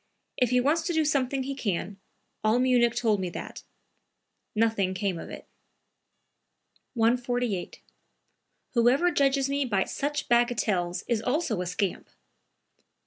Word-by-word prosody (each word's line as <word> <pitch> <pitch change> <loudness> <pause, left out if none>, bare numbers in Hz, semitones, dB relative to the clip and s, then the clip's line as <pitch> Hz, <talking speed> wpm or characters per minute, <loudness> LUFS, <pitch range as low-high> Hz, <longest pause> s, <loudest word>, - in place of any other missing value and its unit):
"If 250 -2 +2
he 250 0 +3
wants 295 +6 +2
to 350 - -1
do 320 -1 +2
something 275 -2 0
he 275 +1 -4
can; 200 -5 -3 0.4
all 215 +2 +3
Munich 245 -2 +3
told 225 -4 +1
me 185 -1 -2
that." - - -7 0.9
Nothing 215 -4 +1
came 190 -3 -2
of - - -8
it.) - - -9 1.5
148. 240 -3 0 0.9
"Whoever 260 +8 +3
judges 275 -3 +2
me 280 +1 0
by 205 -7 +1
such 290 +1 -3
bagatelles 220 -7 +1
is 230 -3 0
also 250 - -1
a 180 - -3
scamp!" 180 +1 -2
240 Hz, 130 wpm, -27 LUFS, 205-270 Hz, 1.5 s, he